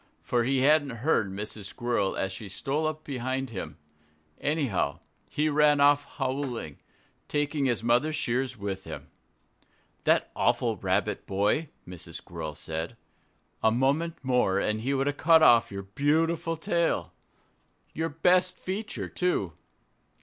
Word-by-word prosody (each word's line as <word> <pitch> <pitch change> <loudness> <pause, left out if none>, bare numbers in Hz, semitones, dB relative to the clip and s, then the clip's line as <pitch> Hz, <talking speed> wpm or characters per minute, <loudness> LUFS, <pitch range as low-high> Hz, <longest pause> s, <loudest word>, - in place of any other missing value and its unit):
For 120 -2 +1
he 135 +1 +2
hadn't 140 -4 +2
heard 110 -11 +2
Mrs. 105 +1 -6
Squirrel 110 -2 -1
as 95 - -1
she 105 +1 -7
stole 140 - -1
up 155 0 -4
behind 130 -1 -3
him. 80 -7 -6 0.6
Anyhow, 135 - 0 0.3
he 150 +1 0
ran 150 -1 +4
off 145 0 +5
howling, 130 - -3 0.5
taking 145 -1 0
his 120 -3 +1
mother's 125 +7 +2
shears 130 -2 -1
with 100 -2 -4
him. - - -8 0.9
"That - - +3
awful - - +2
Rabbit - - -1
boy!" 105 +11 +1 0.2
Mrs. 90 -2 -8
Squirrel 80 -3 -6
said. 80 +10 -5 0.6
"A 110 - +5
moment 140 +8 +1
more 125 -7 +2
and 105 +2 0
he 135 +4 0
would 135 0 +1
have 145 0 -1
cut 160 -1 +6
off 115 -5 +6
your 100 0 -5
beautiful 160 +9 0
tail 170 +1 0 0.8
your 160 +2 -1
best 180 +4 +2
feature, 205 +3 -4
too!" 140 - -1
130 Hz, 135 wpm, -28 LUFS, 105-150 Hz, 0.9 s, cut